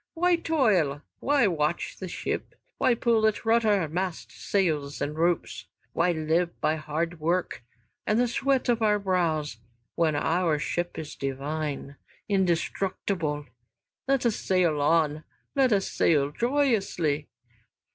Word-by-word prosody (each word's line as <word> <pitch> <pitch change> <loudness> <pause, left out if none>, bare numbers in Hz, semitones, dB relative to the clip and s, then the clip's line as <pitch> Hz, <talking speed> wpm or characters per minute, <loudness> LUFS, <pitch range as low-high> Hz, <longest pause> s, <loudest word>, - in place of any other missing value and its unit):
"Why 355 +1 +3
toil, 210 - +1 0.2
why 280 -3 +3
watch 160 -3 -1
the 190 - -6
ship, - - -4 0.2
why 245 - +3
pull 230 -2 +3
at 215 +1 -2
rudder, 220 -6 +3
masts, 180 +2 -4
sails, 155 -7 -1
and 150 +1 -2
ropes? 170 +2 0 0.3
Why 175 +1 +2
live 165 +2 0
by 155 - +1
hard 160 +2 -3
work 170 -3 -1 0.4
and 215 +2 +2
the 245 - +3
sweat 270 +2 0
of 240 -2 +2
our 210 -1 +3
brows, 170 - 0 0.4
when 160 -3 +1
our 165 +1 +1
ship 175 +3 -3
is 155 -2 -6
divine, 140 +1 -4 0.3
indestructible? 180 -4 -1 0.6
Let 270 -2 +1
us 230 -3 +2
sail 175 -6 +1
on, 155 0 +2 0.3
let 265 -3 +3
us 195 -2 +1
sail 145 -3 +2
joyously." 200 - 0
175 Hz, 130 wpm, -27 LUFS, 155-215 Hz, 0.6 s, Why